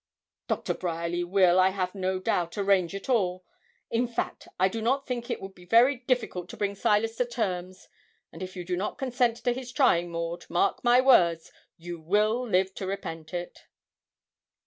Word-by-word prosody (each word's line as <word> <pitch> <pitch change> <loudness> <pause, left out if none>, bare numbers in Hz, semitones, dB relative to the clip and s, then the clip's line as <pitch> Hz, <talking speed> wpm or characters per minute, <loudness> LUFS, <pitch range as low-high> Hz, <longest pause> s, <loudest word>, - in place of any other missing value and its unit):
'Doctor - - -1
Bryerly 170 0 -2
will, 180 0 +4
I 185 0 +5
have 185 -1 -2
no 190 -1 -1
doubt, 175 -1 -1
arrange 195 -2 +2
it 195 - -7
all. 185 -7 0 0.5
In 235 +2 +1
fact, 235 - -4
I 185 - +5
do 225 +4 -4
not 270 +5 +1
think 240 -2 -4
it - - -2
would 195 0 -8
be 180 - -16
very 240 +8 +5
difficult 240 -8 -2
to - - -9
bring 200 -1 -1
Silas 225 +2 +1
to 250 - +2
terms; 185 -6 -4 0.4
and - - -11
if 185 0 -6
you 180 -1 -6
do 180 0 -1
not 190 +4 -3
consent 245 -3 +1
to 245 - +2
his 250 0 -7
trying, 175 -11 +3
Maud, 170 +1 -4
mark 175 +3 +1
my 245 +1 +5
words, 170 -11 +4 0.3
you 170 0 -7
will 210 +8 +2
live 190 0 +2
to 190 - -5
repent 165 -5 -5
it.' 175 0 -6
190 Hz, 185 wpm, -27 LUFS, 175-235 Hz, 0.5 s, I